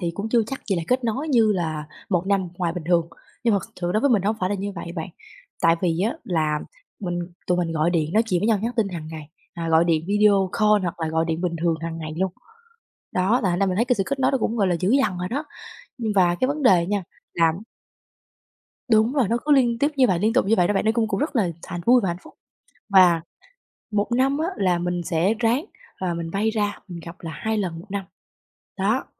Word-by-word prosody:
thì 170 -2 -1
cũng 205 +4 -4
chưa 235 0 +3
chắc 270 - -5
gì 195 - +2
là 170 - -1
kết 255 0 +1
nối 260 +7 -2
như 230 -6 +4
là 160 -5 -2 0.2
1 180 -1 +1
năm 195 -2 +1
ngoài 175 -2 0
bình 175 -3 -6
thường." 170 -2 +2 0.4
Nhưng 230 -3 +4
mà 200 - +2
thực - - -18
sự 175 0 -1
đối 215 - +2
với 280 - +3
mình, 215 -6 +3
nó 200 - +1
hổng 220 - 0
phải 185 - +1
là - - +1
như 200 +1 -4
vậy 170 -2 -7
bạn. 160 +2 -4 0.5
Tại 165 0 +5
vì 170 -2 +1
á 225 +9 0
là 155 -4 0 0.4
mình 175 -3 -3 0.3
tụi 180 0 +1
mình 170 -2 -1
gọi 160 +2 +1
điện 160 -1 0
nói 220 - +4
chuyện 180 -5 +1
với 210 - 0
nhau, 220 -3 +3
nhắn 235 - -1
tin 220 -4 +2
hằng 170 -4 -6
ngày, 155 -2 -8 0.3
à, 165 -1 -4
gọi 165 +1 +4
điện 160 -2 +1
video 200 -2 +3
call 210 -2 +4
hoặc 175 -1 -4
là 160 - -1
gọi 160 +1 +1
điện 165 0 -2
bình 175 -2 -1
thường 170 -1 +2
hằng 165 0 -5
ngày 155 -1 -6
luôn. 190 -1 0 0.8
Đó, 195 +7 +2
là 190 - +2
thành 175 - 0
ra 195 - +3
mình 185 -1 -1
thấy 230 - +3
cái 250 - +1
sự 195 - +1
kết 275 0 -2
nối 260 - +3
nó 270 - +2
cũng 230 0 -1
gọi 200 -3 +2
là 175 - +1
dữ 190 +3 +1
dằn 215 -9 +2
rồi 180 - -3
đó. 280 +8 -3 0.5
Nhưng 225 -3 -2
và 175 -2 +4
cái 255 - +3
vấn 290 +2 -2
đề 180 -8 +5
nha 205 -1 -1 0.3
là 165 -1 +3 1.4
đúng 220 +2 +4
rồi, 270 -7 +2
nó 230 +4 +1
cứ 300 - +2
liên 245 -4 +4
tiếp 290 +3 +2
như 260 -2 +4
vậy, 180 -3 +1
liên 220 +4 +2
tục 255 - +3
như 215 +3 +3
vậy 175 -1 +4
đó 205 - +1
bạn, 200 - 0
nó 220 - +4
cung 225 -1 0
cũng 200 -2 -2
rất 295 0 -2
là 205 -7 +2
thà 175 - -5
vui 245 +1 +6
và 195 - -1
hạnh 170 - -3
phúc. - - -15 0.6
Và, 185 -4 +6 0.7
1 210 +2 -1
năm 270 +3 +2
á 320 - 0
là 180 -3 +1
mình 175 0 -2
sẽ 170 +7 +1
ráng, 240 +6 +1 0.3
à, 180 -2 -2
mình 165 -1 -4
bay 205 +5 0
ra, 205 -2 -1
mình 175 -2 -7
gặp 170 +1 -8
là 165 - -6
2 220 +8 -2
lần 175 -5 -3
1 175 - -14
năm, 200 -1 -3 0.7
đó. 210 +7 +1
195 Hz, 265 wpm, -23 LUFS, 170-225 Hz, 1.4 s, vui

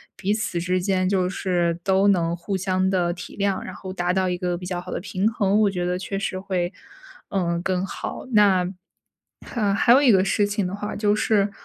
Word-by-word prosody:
彼 195 +2 -1
此 210 -5 -2
之 180 +1 0
间 185 -1 +1
就 185 -2 +1
是 175 -3 0
都 195 +1 +3
能 170 -4 +2
互 195 +3 -4
相 185 0 0
地 180 -2 +1
体 175 +1 -8
谅， 200 -1 0
然 - - -8
后 190 - -7
达 180 -1 -1
到 185 0 +1
一 180 - -1
个 175 0 -2
比 180 - -8
较 180 -1 -3
好 175 - -9
的 - - -3
平 195 +2 0
衡， 205 -2 +1
我 210 -2 +4
觉 180 -2 -3
得 180 +1 -1
确 195 +1 -4
实 190 -1 -3
会， 185 -2 -2 0.6
嗯， 170 -3 0
更 185 0 -1
好。 195 - -6
那 200 -4 +5 0.8
哈 210 -4 0
还 205 - +3
有 260 +3 +7
一 275 - +5
个 190 -4 +5
事 205 +2 +1
情 205 -1 -1
的 180 - -4
话 205 +1 -4
就 205 -1 +2
是， 210 -1 +2
190 Hz, 235 characters per minute, -23 LUFS, 180-200 Hz, 0.8 s, 有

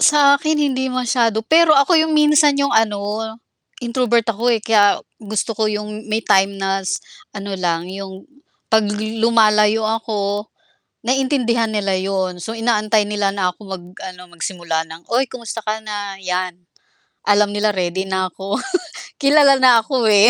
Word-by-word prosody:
Sa 285 -2 +5
akin 310 0 0
hindi 265 -3 0
masyado, 235 -3 0
pero 320 +4 +5
ako 280 +6 +4
yung 315 -1 +1
minsan 300 -1 +4
yung 280 0 0
ano, 210 0 0 0.6
introvert 235 -1 +1
ako, 230 +4 -1
eh, 230 -2 +2
kaya 205 -2 +4 0.2
gusto 215 +2 -3
ko 215 0 -1
yung 210 +1 -5
may 220 +1 -1
time 195 +1 +2
na 195 0 -1
s 185 - -2 0.4
ano 200 0 -6
lang 170 -2 -1
yung 190 -1 -8 0.5
'pag 220 -2 +3 0.3
lumalayo 215 -1 +3
ako 210 -2 -2 0.6
naiintindihan 245 -3 +1
nila 200 -3 -1
yun. 185 -2 -2
So, 220 - -5
inaantay 220 -2 +1
nila 205 -1 -1
na 185 -2 -1
ako - - -40
mag 185 -2 -6 0.2
ano, 180 -1 -9
magsimula 170 -2 -3
ng, 165 +1 -13
"Uy, 250 +2 0
kumusta 230 -2 -6
ka 215 0 -2
na," 205 -2 -6
'yan 180 -1 -3 0.7
alam 205 0 +3
nila 210 +1 0
ready 185 +1 -2
na 190 -1 -2
ako. 195 +4 -4 0.6
Kilala 280 -1 +5
na 250 -3 +6
ako, 250 0 -1
eh, 205 +2 +7
215 Hz, 155 wpm, -19 LUFS, 195-240 Hz, 0.7 s, eh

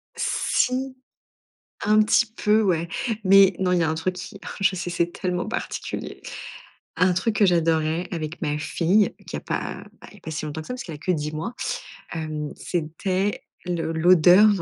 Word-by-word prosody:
si, 260 +1 0 0.9
un 215 +1 +5
petit 215 +2 +4
peu, 215 -1 +2
ouais. 170 -5 +1 0.4
Mais, 195 0 +7
non, 185 -1 +1
il 180 - +3
y - - +3
a 160 - +1
un 160 - -1
truc 180 +3 -2
qui 180 +2 -8
oh - - -9
je 195 -1 +3
sais, 180 -1 -4
c'est 170 0 0
tellement 180 +1 -2
particulier. 220 - -5 0.8
Un 180 0 +4
truc 210 +5 0
que 205 - +5
j'adorais 165 0 +1
avec 160 -2 -5
ma 150 -3 -1
fille 180 +6 +2
qui - - -5
a - - -4
pas, - - -4 0.2
bah, - - -12
il - - -18
y - - -13
a - - -23
pas 160 - -7
si 155 - -4
longtemps 155 +1 -5
que - - -14
ça 250 - -3
parce 250 - -6
qu'elle 165 - -7
a 150 - -9
que 185 - 0
10 150 -2 -2
mois, 160 +10 -4 0.6
hem, 155 -2 -4
c'était 185 +4 -2 0.3
l'o 165 -2 -1
l'odeur, 180 +4 +6
180 Hz, 195 wpm, -24 LUFS, 160-195 Hz, 0.9 s, Mais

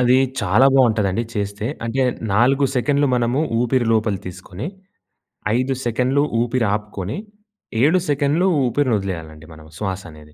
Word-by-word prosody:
అది 125 +1 +4 0.2
చాలా 110 +9 +4
బావుంటదండి 110 -5 +3
చేస్తే. 100 +1 -3 0.2
అంటే 120 +4 0 0.3
4 130 +6 +3
సెకన్లు 145 +3 +2
మనము 120 +3 +1 0.2
ఊపిరి 125 0 +1
లోపల 110 -2 +1
తీసుకొని 90 - -7 0.9
5 130 +1 0
సెకన్లు 125 +4 +1 0.2
ఊపిరి 120 -2 0
ఆపుకొని 105 - -4 0.6
7 160 +7 +4
సెకండ్లు 145 +5 +2 0.2
ఊపిరిని 125 -1 +1
వదిలేయాలండి 80 -5 -6
మనము 80 0 -14
శ్వాస 95 -3 -3
అనేది. 75 0 -15
115 Hz, 130 wpm, -20 LUFS, 100-130 Hz, 0.9 s, అది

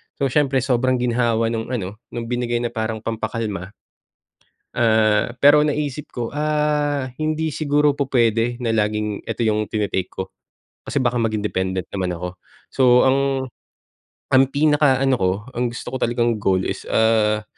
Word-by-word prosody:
so, 135 -2 -1
siyempre 135 -3 +2
sobrang 130 0 +1
ginhawa 115 -2 +1
nung 115 -1 -3
ano, 105 -4 -4
nung 120 -1 -5
binigay 120 -1 -1
na 120 - -2
parang 110 -1 -3
pampa-kalma, 110 -3 -4 1.0
ah, 110 -1 +3
pero 145 +1 +6
naisip 150 -1 -2
ko, 120 +1 -5
ah, 150 -2 0
hindi 155 +1 -2
siguro 150 -1 +2
pupwede 120 -4 +1
na 115 -3 -1
laging 105 -1 -1
ito - - -6
yung 105 -1 0
tine-take 100 -4 -2
ko 95 0 -7 0.5
kasi, 140 - -2
baka 125 -1 0
maging 110 -2 0
dependent 95 -3 -2
naman 95 -2 -1
ako 90 +2 -6 0.3
so, 135 - 0 0.2
ang 135 0 +1 0.9
ang 130 +1 +6
pinaka-ano 140 -2 +3
ko 95 -1 +2 0.2
ang 120 - -1
gusto - - -7
ko - - -2
talagang 120 -1 +1
goal 95 -2 +1
is, - - -4
ah, 110 -1 +2
120 Hz, 145 wpm, -21 LUFS, 110-135 Hz, 1.0 s, pero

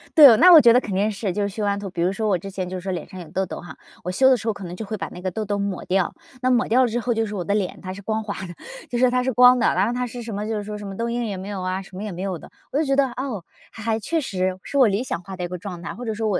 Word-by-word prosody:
对， 280 -8 +10
那 360 +1 +8
我 325 - +11
觉 235 -1 +7
得 250 - +6
肯 200 - -5
定 205 +3 +2
是 200 -1 -2
就 205 - -2
是 200 - 0
修 210 +2 -4
完 200 0 0
图 200 -2 -5
比 175 -2 -4
如 180 +2 +2
说 215 +2 -2
我 190 -3 +3
之 195 +3 -8
前 185 -1 -4
就 185 0 -5
是 - - -6
说 190 +1 -3
脸 175 -3 -4
上 185 - -10
有 165 - -11
痘 190 0 -1
痘 - - -7
哈， 165 -5 -11 0.3
我 180 - -2
修 265 +7 +5
的 260 - +6
时 225 +2 -7
候 220 - +2
可 200 - -10
能 175 +1 -6
就 220 - -6
会 215 +1 -4
把 - - -4
那 180 - -10
个 185 -1 -2
痘 215 +3 -3
痘 205 0 -1
抹 200 -2 -3
掉， 185 -1 +1 0.3
那 255 - +2
抹 245 0 +2
掉 250 +4 +4
了 - - +3
之 240 +2 -1
后 240 0 0
就 225 0 0
是 210 - -6
我 180 - -2
的 200 - -1
脸 195 -3 -2
它 185 -1 -6
是 200 - -9
光 220 +2 -1
滑 205 -1 -4
的， 175 - -8 0.4
就 245 - -2
说 250 0 +4
它 250 0 +1
是 260 - 0
光 250 +1 +7
的， 230 - +3
然 190 +4 +2
后 240 - -1
它 250 0 -1
是 240 +1 -7
什 225 -2 -6
么 210 +1 -3
就 220 - -2
是 205 - -3
说 210 0 -6
什 205 - -8
么 195 - -6
痘 230 0 -1
印 240 0 -1
也 200 -3 -3
没 190 +2 -7
有 200 -2 -4
啊， 185 +1 -2
什 190 -1 -14
么 200 - -5
也 210 - -4
没 180 +1 -6
有 190 -3 -2
的。 - - -14 0.2
我 280 - 0
就 315 - +3
觉 275 0 +2
得， 275 -1 +4
哦， 245 -9 -5 0.3
还 220 - -10
还 225 -1 0
确 325 +9 -1
实 185 -7 -2
是 280 - -3
我 255 -4 +7
理 205 +4 0
想 180 - -3
化 195 -1 -8
的 180 - -4
一 - - -1
个 180 +1 -5
状 180 -2 -7
态， - - -5
或 245 +2 -7
者 220 - -1
说 220 +1 -2
我， 200 - +1
205 Hz, 410 characters per minute, -23 LUFS, 185-235 Hz, 0.4 s, 我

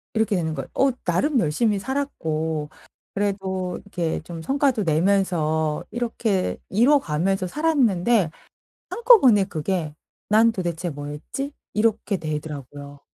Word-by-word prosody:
이렇게 220 -2 +2
되는 160 -3 -1
거예요. 135 - -5
어 270 - +3 0.2
나름 255 - +2
열심히 200 +7 +1
살았고 160 - -2 0.4
그래도 190 -3 -2
이렇게 175 -5 -2
좀 165 0 -8
성과도 270 - +1
내면서 160 -3 +1
이렇게 225 -5 -1
이뤄 250 +9 +4
가면서 185 - -1
살았는데 235 - +2 0.6
한꺼번에 390 - +6
그게 160 -3 -3 0.3
'난 225 +2 +5
도대체 175 -3 -3
뭐 145 0 -7
했지?' 270 - -5 0.2
이렇게 215 -2 +1
되더라고요. 145 -2 -6
190 Hz, 290 characters per minute, -23 LUFS, 160-230 Hz, 0.6 s, 한꺼번에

